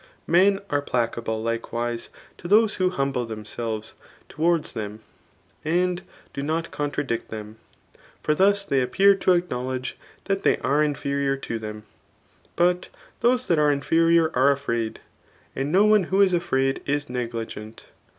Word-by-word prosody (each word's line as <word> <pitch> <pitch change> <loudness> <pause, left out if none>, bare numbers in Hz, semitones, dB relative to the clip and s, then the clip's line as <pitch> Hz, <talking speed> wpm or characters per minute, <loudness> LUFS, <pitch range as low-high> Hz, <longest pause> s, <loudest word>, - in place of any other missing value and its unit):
Men 195 +4 +4
are 145 0 +2
placable 115 -4 -2
likewise 115 +1 -3 0.3
to 175 - -7
those 215 +3 +5
who 185 -1 +1
humble 135 -7 -1
themselves 110 0 -5 0.4
to* 155 - -10
wards 170 -1 +2
them, 110 -1 -6 0.6
and 175 +3 +1 0.3
do 140 - -4
not 160 +3 -2
contradict 145 -4 -2
them; 110 0 -8 0.6
for 150 - +1
thus 200 +4 +3
they 135 -8 +1
appear 195 +11 +4
to 185 - +3
acknowledge 130 -7 -2 0.3
that 195 -1 -1
they - - +3
are 145 +2 +2
inferior 140 -2 -1
to 115 -4 -4
them; 105 -1 -7 0.7
but 180 +1 +2 0.3
those 250 +1 +2
diat 165 -3 +3
are 150 -1 +4
inferior 165 +3 +3
are 130 +2 +5
afraid; 115 -5 -2 0.6
and 135 +2 -2
no 195 +4 +5
one 210 -3 +4
who 190 +3 0
is 195 -2 +5
afraid 135 -6 +1
is 145 +1 -1
negligent. 115 -3 -5
140 Hz, 145 wpm, -24 LUFS, 120-175 Hz, 0.7 s, those